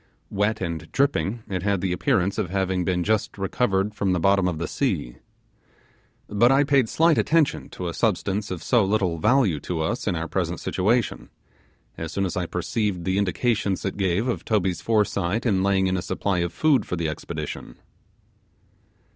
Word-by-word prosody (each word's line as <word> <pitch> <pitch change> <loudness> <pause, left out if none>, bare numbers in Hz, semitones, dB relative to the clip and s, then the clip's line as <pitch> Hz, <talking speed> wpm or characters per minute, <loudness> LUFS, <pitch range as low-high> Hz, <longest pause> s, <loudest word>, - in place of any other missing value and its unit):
Wet 105 +2 0
and 85 -4 -4
dripping, 120 -5 0
it 95 -2 -3
had 100 0 +1
the 95 0 -1
appearance 95 -1 +1
of 90 - -1
having 95 -1 0
been 90 0 0
just 110 +2 0
recovered 100 0 0
from 100 -3 0
the 90 - +1
bottom 95 +1 +3
of 85 -3 -2
the 85 0 -3
sea. - - -2 1.1
But 120 +5 +3
I 135 +2 +5
paid 135 -5 +2
slight 165 0 +3
attention 160 -3 +1
to 90 - -6
a 85 - -3
substance 105 0 0
of 90 -3 -5
so 120 -4 +3
little 95 -4 0
value 110 - +3
to 80 +3 -3
us 105 +11 -2
in 95 - +1
our 80 0 -3
present 85 -1 -2
situation, 110 +4 0 0.7
as 80 0 -4
soon 100 +2 -1
as 90 - -3
I 90 -2 -1
perceived 90 +1 -2
the 95 +2 0
indications 100 0 0
it 95 - -2
gave 100 +3 0
of 125 - -2
Toby's 95 -5 0
foresight 105 -1 0
in 100 -6 +2
laying 95 0 +2
in 95 0 +1
a - - -2
supply 90 +2 -1
of 85 -1 -1
food 155 -4 +2
for - - -2
the 85 -2 -1
expedition. 75 - -6
95 Hz, 180 wpm, -24 LUFS, 90-110 Hz, 1.1 s, I